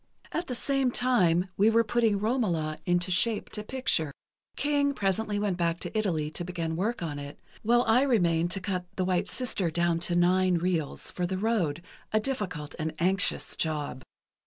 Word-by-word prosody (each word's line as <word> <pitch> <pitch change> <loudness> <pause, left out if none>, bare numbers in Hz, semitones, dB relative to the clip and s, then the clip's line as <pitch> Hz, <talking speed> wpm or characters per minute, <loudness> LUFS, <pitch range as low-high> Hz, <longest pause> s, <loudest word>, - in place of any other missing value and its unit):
At 345 - -2
the 250 - -3
same 270 +1 +1
time 190 -9 +2
we 205 +3 +5
were 230 +1 +4
putting 225 -1 +2
'Romola' 195 -9 0
into 175 +1 +1
shape 215 +4 +1
to 210 - -2
picture. 210 - 0 0.4
King 285 -1 +1
presently 205 +1 0
went 205 -3 0
back 170 -1 0
to - - -6
Italy 165 -8 0
to 165 - -3
begin 170 -2 -3
work 205 +3 -1
on 145 -3 -4
it, 145 0 -8 0.2
while 240 +2 +3
I 225 +2 +4
remained 175 -11 +2
to 195 - -3
cut 185 -2 -2
'The 185 - 0
White 180 -1 0
Sister' 215 -8 -1
down 170 0 +1
to 175 +1 +1
nine 180 +1 +3
reels, 170 -3 -1
for 180 -1 -2
the 190 +1 -2
road, 185 -7 0 0.3
a 215 - +3
difficult 190 - -3
and 155 0 -3
anxious 185 +3 +1
job." 150 -5 -2
185 Hz, 180 wpm, -28 LUFS, 170-225 Hz, 0.4 s, we